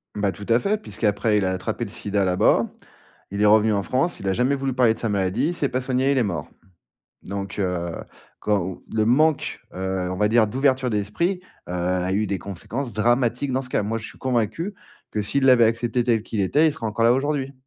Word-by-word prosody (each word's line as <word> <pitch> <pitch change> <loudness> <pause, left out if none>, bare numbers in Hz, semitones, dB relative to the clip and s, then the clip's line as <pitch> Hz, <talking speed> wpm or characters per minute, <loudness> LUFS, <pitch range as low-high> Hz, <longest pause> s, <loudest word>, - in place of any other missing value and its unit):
Bah, 100 -2 0
tout 100 +3 -10
à 115 - +5
fait, 210 +5 0
puisqu'après 105 - 0
il 100 - +1
a 95 - +1
attrapé 105 +5 -3
le 100 - -9
sida, 100 -1 -1
là-bas. 90 0 +3 0.7
Il 100 - -2
est - - +5
revenu 110 +1 +5
en 100 -1 0
France, 135 - 0
il 95 - -5
a - - +2
jamais 125 +6 +2
voulu 135 -1 -2
parler 120 -3 +4
de - - -10
sa 115 - -1
maladie, 100 +5 0
il - - -2
s'est 145 -5 -1
pas 130 - -1
soigné, 130 +1 +1
il 140 - +1
est 125 - +3
mort. 95 -6 -3 0.8
Donc, 100 +1 -5
heu, 90 -3 -1 0.5
quand, 95 -3 0
heu, - - -15
le 110 -1 +2
manque, 150 +5 +2
heu, 95 0 -2
on 95 - -3
va 105 +2 +2
dire 115 0 +4
d'ouverture 130 +1 +1
d'esprit, 110 - -1 0.3
heu, - - -5
a 90 +1 -1
eu 105 +2 +1
des 100 -1 -2
conséquences 115 +7 -5
dramatiques 120 +4 +1
dans 130 +1 0
ce 125 - -9
cas. - - +1
Moi, 115 +2 -2
je 110 - -7
suis - - -12
convaincu 130 - -1 0.4
que 105 - -1
s'il 135 +7 0
l'avait 125 -3 +7
accepté 115 +2 0
tel 115 -3 +2
qu'il 110 - -3
était, 145 - +3
il - - -1
serait 115 - -5
encore 110 +1 0
là 115 - +6
aujourd'hui. 135 0 -1
110 Hz, 230 wpm, -23 LUFS, 100-130 Hz, 0.8 s, l'avait